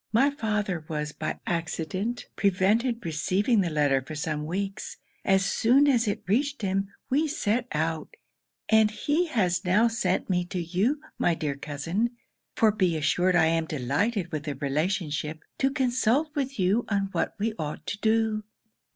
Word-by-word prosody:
My 270 +6 +4
father 210 - -2
was, 150 -1 -3
by - - -4
accident, 180 +7 -2
prevented 210 +4 +2
receiving 190 +8 +1
the 180 - 0
letter 145 -3 +2
for 155 +4 -8
some 150 0 -3
weeks: 195 +3 -4 0.3
as 195 0 +3
soon 250 +8 +4
as 245 -5 +3
it 205 - -2
reached 270 +6 0
him, 195 0 0 0.2
we 300 +4 +3
set 245 -6 0
out, 160 +1 -2 0.5
and 220 -1 +5
he 295 +10 0
has 185 - +1
now 205 +5 +4
sent 195 -5 0
me 180 -2 +1
to 180 +1 -4
you, 190 - 0 0.2
my 170 - +3
dear 150 -3 -2
cousin 165 - -2 0.4
(for 220 -1 +4
be 185 -6 +1
assured 180 +4 +2
I 165 - +5
am 165 0 +1
delighted 165 - -1
with 155 -2 -4
the 145 -2 -3
relationship) 155 +2 -2 0.2
to 270 - +3
consult 255 +2 +1
with 275 -1 -2
you 200 +5 +2
on 200 -2 0
what - - -1
we 215 +2 -1
ought 150 -1 -4
to 200 - -4
do.' 220 -1 +1
195 Hz, 160 wpm, -27 LUFS, 160-230 Hz, 0.5 s, and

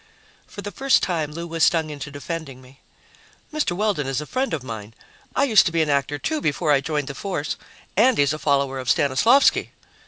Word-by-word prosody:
For 200 - -9
the 205 - -5
first 270 +7 +2
time, 160 -5 -1
Lou 170 +3 -6
was 165 -1 -1
stung 160 -3 +3
into 145 0 -7
defending 145 -1 -6
me. 130 +1 -18 0.7
"Mr. 305 -12 0
Weldon 205 -9 0
is 135 0 -1
a 150 - -5
friend 260 - -2
of 150 -5 -3
mine 110 -3 -8 0.4
I - - +3
used 225 -8 +5
to - - -1
be 165 -1 +2
an 150 - -1
actor, 140 +1 0
too, 310 - -2
before 150 +1 0
I 140 -2 +4
joined 150 0 -2
the 140 - -5
force 155 -2 -3 0.4
and 245 +5 +4
he's 145 0 +3
a 155 - -5
follower 140 -3 +1
of 130 -1 -4
Stanislavsky." 175 - +3
150 Hz, 210 wpm, -23 LUFS, 140-190 Hz, 0.7 s, used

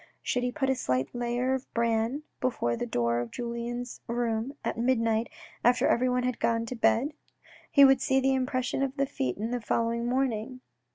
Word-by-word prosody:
Should 250 - 0
he 250 0 -1
put 270 -1 0
a - - +1
slight 130 - -1
layer 245 +1 0
of 265 0 -4
bran 230 +4 +1 0.2
before 235 - 0
the 240 - -3
door 120 - +1
of 120 -1 -3
Julien's 240 - -5
room 235 +2 -1
at - - -1
midnight 230 -2 +1 0.3
after 245 +1 +4
everyone 250 +1 +2
had 250 -2 -1
gone 230 0 +1
to 250 - -5
bed? 245 +5 +2 0.6
He 280 -1 +8
would 270 0 +5
see 265 0 +3
the 270 0 +2
impression 255 0 -1
of 275 +1 -1
the 275 - +2
feet 130 - -3
in 225 +3 -3
the 245 -1 -2
following 230 +2 0
morning. 255 -1 -1
245 Hz, 185 wpm, -28 LUFS, 230-260 Hz, 0.6 s, He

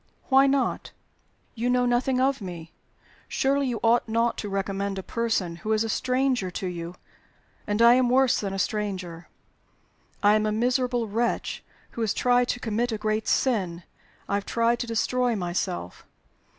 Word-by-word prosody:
"Why 270 0 +6
not?" 275 -1 0 0.6
"You 240 +2 -2
know 250 0 +2
nothing 250 +1 +1
of 265 -1 +1
me. 170 -4 -8 0.6
Surely 275 0 +1
you 240 -3 -2
ought 230 0 +3
not 230 +1 +1
to 205 - -4
recommend 195 0 -2
a 190 - -4
person 215 -8 -1
who 220 +4 -2
is 215 0 +2
a 225 - -3
stranger 255 -5 0
to 180 - -5
you? 175 -1 -5 0.7
And 210 +2 +2
I 235 +1 +8
am 250 -1 +3
worse 260 0 +3
than 200 -2 -3
a 195 - -4
stranger. 185 -5 -3 1.0
I 205 +1 +6
am 215 0 +2
a - - 0
miserable 245 +1 0
wretch 230 +3 -2 0.3
who 235 - -6
has 220 -3 0
tried 245 0 +3
to 245 - -2
commit 235 +1 -1
a 220 - -2
great 215 +1 -1
sin 185 -9 0 0.4
I - - -3
have 200 0 -1
tried 235 +1 +1
to 240 - -3
destroy 245 +1 0
myself. 175 - -3
225 Hz, 170 wpm, -26 LUFS, 195-245 Hz, 1.0 s, I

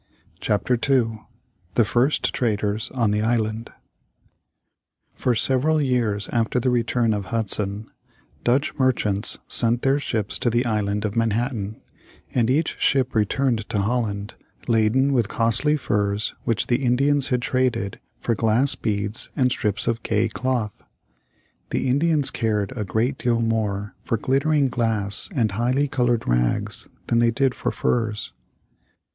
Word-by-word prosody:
] - - -34
CHAPTER 105 +4 0 0.2
II 115 -5 +2 0.6
THE 120 - +4
FIRST 125 +7 +1
TRADERS 105 -2 -1
on 115 -5 +2
the 105 0 0
ISLAND 110 0 -1 1.4
For 125 - 0
several 135 +7 +1
years 120 -7 0
after 115 +1 0
the 125 +1 +1
return 120 -1 +1
of 100 -2 -3
Hudson, 105 -1 -2 0.6
Dutch 135 +5 +1
merchants 110 -6 +1
sent 120 0 +3
their 135 +2 +3
ships 110 -7 0
to 120 - +1
the 120 +2 +1
Island 105 -2 -1
of 105 - -3
Manhattan, 115 -1 -1 0.5
and 120 -2 +2
each 150 +5 0
ship 130 -2 +2
returned 115 +1 0
to 115 - -1
Holland 105 -1 -1 0.3
laden 120 +4 +2
with 120 -5 +1
costly 115 +8 +1
furs 105 -5 -1
which 115 -2 0
the 125 +3 0
Indians 140 +3 +2
had 125 -1 0
traded 125 -7 -1 0.2
for 115 - -1
glass 115 +5 +3
beads 105 0 -2
and 125 -2 +2
strips 105 -4 -1
of 115 0 0
gay 110 +1 +1
cloth. 120 -2 -2 0.9
The - - -1
Indians 145 +2 +2
cared 105 -2 -1
a 110 - -2
great 115 +8 -1
deal 120 -1 +1
more 105 -3 -1
for 115 - -1
glittering 140 +5 +1
glass 110 -5 +1
and 115 -6 +1
highly 125 +7 +1
colored 120 -4 0
rags - - 0 0.2
than 115 - +1
they 120 0 +4
did 130 +2 +1
for - - -2
furs. 110 -3 -1
115 Hz, 140 wpm, -23 LUFS, 105-130 Hz, 1.4 s, THE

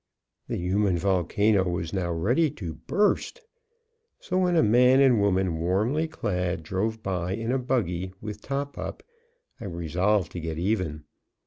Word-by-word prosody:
The - - -2
human 95 +1 +1
volcano 95 +3 +2
was 85 -1 -3
now 90 -3 -1
ready 120 - +2
to 95 - -6
burst. 205 - 0 0.8
So 185 0 -1
when 180 -1 +2
a 165 - +5
man 125 +4 +5
and 130 -6 +5
woman 95 -4 +1
warmly 110 - +1
clad 90 - -2
drove 110 +7 -2
by 90 -1 -2
in 115 +3 -2
a 135 - +1
buggy, 95 -8 -1
with 105 -1 -7
top 140 +3 -4
up, - - -6 0.6
I - - -7
resolved 90 +2 0
to 90 - -5
get 80 -1 -4
even. 90 -5 -1
100 Hz, 150 wpm, -26 LUFS, 90-120 Hz, 0.8 s, a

